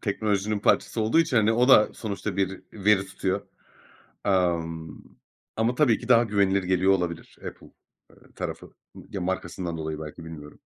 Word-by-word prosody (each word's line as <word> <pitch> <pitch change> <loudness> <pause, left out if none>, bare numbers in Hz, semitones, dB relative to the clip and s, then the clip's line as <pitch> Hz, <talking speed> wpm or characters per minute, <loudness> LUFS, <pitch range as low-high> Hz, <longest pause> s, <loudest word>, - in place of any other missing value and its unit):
teknolojinin 105 0 -1
parçası 110 - +1
olduğu 110 +8 +2
için, 155 -6 0
hani, 110 0 +4
o 120 +3 +3
da 105 -5 +7
sonuçta 100 -3 -4
bir 95 -1 -1
veri 100 -1 +2
tutuyor. 95 -1 -3 0.8
Emm, 85 -4 0 0.6
ama 115 +2 +1
tabii 125 -4 +3
ki 120 - -10
daha 120 -1 +6
güvenilir 100 -3 +2
geliyor 95 +1 +3
olabilir 90 -3 -3
Apple, - - -13 0.4
eee, - - -21 0.2
tarafı. - - -6 0.2
M - - -11
ya 100 - -4
markasından 90 -1 -3
dolayı 80 -1 -4
belki, 80 +1 -8
bilmiyorum. 75 -3 -10
95 Hz, 155 wpm, -26 LUFS, 85-110 Hz, 0.8 s, da